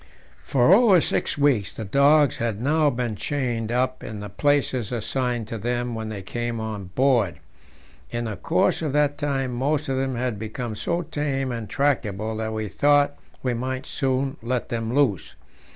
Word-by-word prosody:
For 135 +6 +4
over 205 -4 +6
six - - -1
weeks 140 -9 +2
the 110 - -5
dogs 140 +5 +4
had 115 -3 -2
now 150 +4 +3
been 120 -4 -2
chained 120 -3 -2
up 130 +1 0
in 110 -2 -6
the 105 0 -6
places 135 -4 +1
assigned 120 0 -1
to 115 - -4
them 120 +2 -2
when 110 -1 -4
they 100 -3 -6
came 120 +3 -3
on 110 -3 -4
board. 115 -1 +2 0.7
In 120 0 -3
the 110 -2 -3
course 90 - +1
of 150 -4 -2
that 145 -1 +2
time 135 -3 -1
most 140 +4 0
of 135 - 0
them 130 -1 -1
had 120 -3 -2
become 110 +1 -4
so 170 +10 -1
tame 145 -4 -2
and 115 -3 -5
tractable 110 -6 0
that 110 0 -2
we 110 -1 -3
thought 145 +5 +3 0.3
we 125 -2 +1
might 130 +2 -3
soon 135 -1 -1
let 120 +1 -2
them 115 -1 -2
loose. 125 - +1
125 Hz, 175 wpm, -24 LUFS, 110-140 Hz, 0.7 s, over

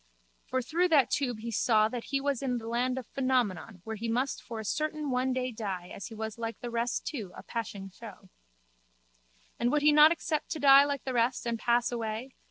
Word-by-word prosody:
For 260 -1 -1
through 340 +8 +1
that 300 -7 +4
tube 245 -6 -1
he 230 +1 -4
saw 215 -1 +3
that 235 +1 -5
he 275 - -1
was 280 -2 -1
in 255 -3 -1
the 225 -1 -7
land 250 +2 0
of 260 - -4
Phenomenon 230 - -1
where 220 0 -5
he 230 +2 -3
must 255 +4 -1
for 230 -2 -7
a 220 - -6
certain 305 +3 -2
one 255 +1 +1
day 255 0 -1
die 195 -6 -5
as 200 - -7
he 225 - -10
was 220 +1 -5
like 230 0 -4
the 240 - -6
rest 235 +1 -1
too 220 - -5
a - - -9
passing 200 -4 -5
show. 205 -2 -12 1.3
And 240 +1 +2
would 295 -1 +1
he 300 - +7
not 300 +1 +8
accept 315 -2 -2
to 315 - -6
die 275 0 +8
like 285 -1 -3
the 260 - -3
rest 245 +1 +1
and 235 -1 -1
pass 240 +1 +2
away? 230 +2 -4
245 Hz, 220 wpm, -30 LUFS, 225-275 Hz, 1.3 s, not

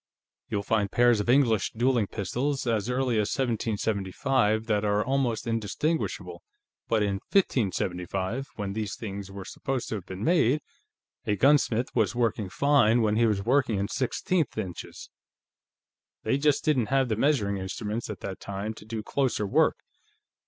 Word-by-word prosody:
You'll 100 -1 -1
find 105 -2 0
pairs 120 -2 +4
of 105 - -2
English 120 -6 +3
dueling 120 -2 +2
pistols 125 +9 -2
as 115 -1 0
early 125 -2 +1
as 105 -1 +1
1775 110 -1 0
that 105 -3 +1
are 105 0 +1
almost 130 -3 0
indistinguishable, 115 - -2 0.5
but 110 -2 +2
in 100 -1 -1
1575, 95 - 0
when 100 -3 -4
these 105 -1 -3
things 100 -3 -6
were 100 -1 -8
supposed 135 -3 -4
to - - -2
have 95 - -10
been 95 +2 -6
made, 150 -2 +3 0.6
a 105 - +1
gunsmith 125 0 +3
was 110 -4 +2
working 115 -4 0
fine 120 -1 +3
when 105 -1 +2
he 115 +1 +4
was 100 -3 0
working 125 -2 +2
in 100 +1 -1
sixteenth 140 +4 -1
inches. 95 -5 -6 1.1
They 135 - +1
just 150 -1 +2
didn't 130 -8 +2
have 135 -1 +2
the 110 - 0
measuring 110 -6 +1
instruments, 105 +4 -4
at 105 - -6
that 95 - -5
time, 100 +2 -4
to 105 - -13
do 110 -1 -5
closer 130 -4 0
work. 100 - +3
110 Hz, 155 wpm, -27 LUFS, 100-130 Hz, 1.1 s, pairs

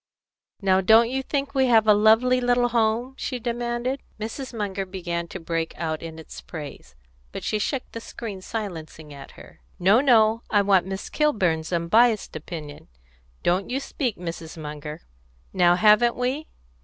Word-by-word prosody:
"Now 190 -1 +3
don't 225 +4 +5
you 265 +1 -1
think 280 +1 -3
we 265 -2 +3
have 225 -3 +5
a 210 - +8
lovely 225 +5 +4
little 245 0 +2
home?" 235 +2 0
she 255 - -3
demanded. 240 +2 -2 0.2
Mrs. 225 +5 -5
Munger 200 -4 -3
began 175 -2 -4
to 190 - -7
break 165 -1 -3
out 160 -2 -3
in 165 -1 -8
its 160 - -10
praise, 145 - -9 0.4
but - - -7
she 215 - -1
shook 255 +5 -1
the 230 - -7
screen 210 -4 -7
silencingly 165 -8 -6
at 140 -1 -11
her. - - -15 0.2
"No, 195 +7 +4
no! 230 -4 +4
I 205 -1 +3
want 190 -2 +3
Miss 190 +1 -5
Kilburn's 185 - 0
unbiassed 210 +7 +2
opinion. 155 -2 -8 0.6
Don't 185 +2 +1
you 260 +2 -1
speak, 260 -4 -3
Mrs. 165 -1 -7
Munger! 150 0 -7 0.5
Now 175 -2 +4
haven't 215 +5 +5
we?" 260 +5 -2
210 Hz, 160 wpm, -24 LUFS, 170-240 Hz, 0.6 s, a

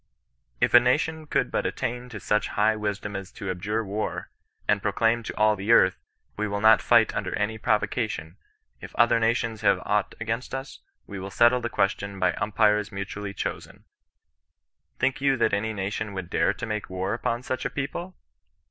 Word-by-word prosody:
" - - -45
If - - -6
a 120 - +11
nation 155 +5 0
could - - 0
but - - 0
attain 125 +1 -4
to 110 -3 -7
such 105 +4 +1
high 110 +1 +4
wisdom 105 -1 -3
as 95 0 -6
to 95 -2 -4
abjure 105 +5 -2
war, 105 +2 -4 0.4
and 105 -1 +2
proclaim 115 +4 +1
to 110 - -7
all 105 0 +4
the 100 +3 -1
earth, 95 -5 +5 0.2
' - - -42
we 105 +1 -1
will 100 0 -2
not 110 0 +6
fight - - +4
under - - -2
any 110 +2 -2
provocation; 105 -5 -1 0.4
if - - -11
other 120 0 +4
nations 115 -1 0
have 100 -2 +3
aught 105 -2 0
against 115 +4 -3
us, 135 - -7 0.3
we 100 - -7
will 95 +1 -6
settle 120 +4 +4
the 120 - -2
question 100 -1 -1
by 90 -1 +2
imipires 105 0 +1
mutually 100 0 -5
chosen;' - - -5 1.1
think 130 +1 0
you 135 -1 +3
that 115 - +2
any 105 +2 0
nation 105 +1 -3
would 95 -2 -6
dare - - +2
to - - -6
make 105 -1 -4
war 95 +1 -2
upon 120 +1 -2
such 130 0 -3
a - - -1
people 170 +6 -5
105 Hz, 190 wpm, -26 LUFS, 100-115 Hz, 1.1 s, a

